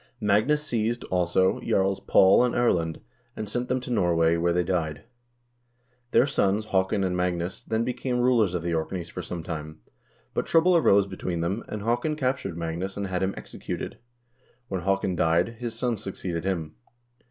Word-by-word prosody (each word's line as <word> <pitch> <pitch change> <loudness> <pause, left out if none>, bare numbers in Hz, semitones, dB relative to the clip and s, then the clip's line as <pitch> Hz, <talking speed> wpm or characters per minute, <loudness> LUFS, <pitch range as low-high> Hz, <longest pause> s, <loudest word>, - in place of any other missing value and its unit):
1 - - -6
Magnus 125 +10 +3
seized, 115 -2 -1
also, 90 +1 +2
jarls 95 0 +1
Paul 95 +5 +5
and 125 - 0
Erlend, 85 -9 +1 0.3
and 110 - -5
sent 120 +4 -2
them 130 - +1
to 125 - -6
Norway, 85 -6 +3
where 85 +1 +1
they 90 +1 +2
died. 80 -4 -2 1.1
Their 125 - +4
sons 105 -6 +1
Haakon 95 0 +1
and 90 -1 0
Magnus 90 +3 -2
then 110 0 0
became 125 0 -2
rulers 120 -7 +3
of 85 - -2
the 85 0 -1
Orkneys 85 +2 -3
for - - -6
some 85 -2 -6
time, 80 -3 -6 0.5
but - - -1
trouble 170 +2 +4
arose 100 - +5
between 90 -3 -4
them, 95 +7 -2
and 105 -1 -5
Haakon 120 +7 0
captured 130 - -2
Magnus 85 +4 -4
and 100 - -2
had 95 -1 -2
him 95 +1 0
executed. - - -6 0.7
When 95 -2 -2
Haakon 95 0 0
died, 85 +4 +3
his 120 -2 -4
sons 115 -3 -1
succeeded 90 -4 -4
him. 85 -5 -2
95 Hz, 175 wpm, -26 LUFS, 85-115 Hz, 1.1 s, Paul